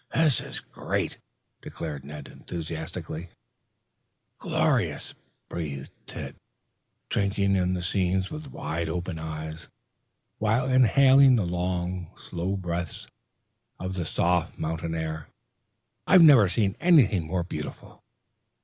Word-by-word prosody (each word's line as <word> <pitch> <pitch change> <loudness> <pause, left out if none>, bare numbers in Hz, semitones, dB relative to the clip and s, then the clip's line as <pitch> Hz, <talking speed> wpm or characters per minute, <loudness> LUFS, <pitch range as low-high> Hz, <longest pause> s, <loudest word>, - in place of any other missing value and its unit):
"This 155 -5 +3
is - - -7
great!" - - -3 0.4
declared 75 -4 -6
Ned 75 0 -8
enthusiastically. 80 0 -6 1.1
"Glorious," - - 0 0.3
breathed 70 -5 -5 0.2
Tad, - - -7 0.7
drinking 100 0 +1
in 90 -1 +1
the 90 - -3
scene 95 +1 +1
with 155 -1 -6
wide 80 - -3
open 85 0 -3
eyes, 80 0 -6 0.7
while 110 +4 +2
inhaling 130 +1 +6
in 90 -6 0
long, 90 -1 -2
slow 90 +3 -3
breaths, 85 -3 -4 0.7
the 95 -1 -3
soft 85 +1 0
mountain 80 +1 -3
air. 80 -1 -4 0.8
"I 185 - +7
never 140 - +8
saw 100 0 +2
anything 125 - +4
more 90 +1 -1
beautiful." 75 -3 -7
90 Hz, 105 wpm, -27 LUFS, 80-100 Hz, 1.1 s, never